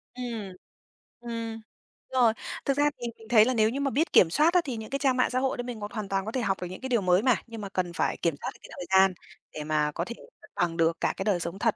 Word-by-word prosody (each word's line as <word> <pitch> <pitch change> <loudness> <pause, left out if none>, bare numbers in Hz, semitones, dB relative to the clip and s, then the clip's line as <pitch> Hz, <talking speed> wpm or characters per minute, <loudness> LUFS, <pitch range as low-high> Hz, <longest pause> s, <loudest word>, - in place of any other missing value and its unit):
Ừm. 230 -6 -5 0.7
Ừm. 230 -1 -5 0.5
Rồi, 240 -4 +4 0.3
thực 275 0 +1
ra 290 0 +4
thì 240 - -2
mình 225 - -14
thấy 220 -2 +7
là 255 - +1
nếu 220 -2 +3
như 270 - -3
mà 280 -1 0
biết 310 +7 0
kiểm 170 - +7
soát 305 - +3
á, 360 - +5
thì 255 -5 -3
những 220 0 -7
cái 275 +1 -2
trang 265 -2 +2
mạng 250 - +3
xã 255 - 0
hội 265 -1 0
đó - - -2
mình 240 -2 -6
hoàn 210 -1 -5
toàn 195 0 -1
có 220 - -4
thể 255 - -1
học 195 -4 -1
được 180 - -3
những 185 +6 -9
cái 260 - -4
điều 240 -4 +2
mới 185 +1 +3
mà, 255 -1 +4
nhưng 225 -2 -8
mà 200 - -5
cần 180 -2 -2
phải - - 0
kiểm 165 -4 0
soát - - -3
được - - -20
cái - - -12
thời 180 - -5
gian 190 -1 +5 0.4
để 150 - -5
mà 150 -1 +1
có 170 +3 -3
thể 235 - -6 0.3
cân 215 - -17
bằng 175 -3 0
được 165 0 +2
cả - - +1
cái - - -2
đời 200 -4 +2
sống 170 +3 -5
thật, 225 -1 +2
220 Hz, 295 wpm, -27 LUFS, 185-250 Hz, 0.7 s, thấy